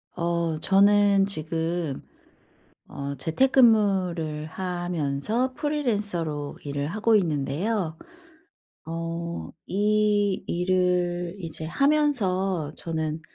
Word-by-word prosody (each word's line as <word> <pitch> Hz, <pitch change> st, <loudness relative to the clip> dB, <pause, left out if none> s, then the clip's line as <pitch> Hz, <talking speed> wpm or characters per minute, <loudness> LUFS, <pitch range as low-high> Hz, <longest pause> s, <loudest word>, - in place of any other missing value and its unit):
어 170 Hz, -2 st, -1 dB
저는 200 Hz, +2 st, +4 dB
지금 165 Hz, -3 st, -3 dB, 0.8 s
어 140 Hz, 0 st, -5 dB
재택근무를 185 Hz, -, +2 dB
하면서 175 Hz, -, -2 dB
프리랜서로 205 Hz, -, -2 dB
일을 140 Hz, 0 st, -2 dB
하고 215 Hz, +6 st, +2 dB
있는데요. 165 Hz, +2 st, 0 dB, 0.9 s
어 165 Hz, +1 st, -4 dB, 0.4 s
이 205 Hz, 0 st, +2 dB
일을 180 Hz, 0 st, 0 dB
이제 165 Hz, -3 st, -6 dB
하면서 195 Hz, -, +1 dB
저는 160 Hz, -1 st, -3 dB
175 Hz, 170 characters per minute, -25 LUFS, 160-205 Hz, 0.9 s, 저는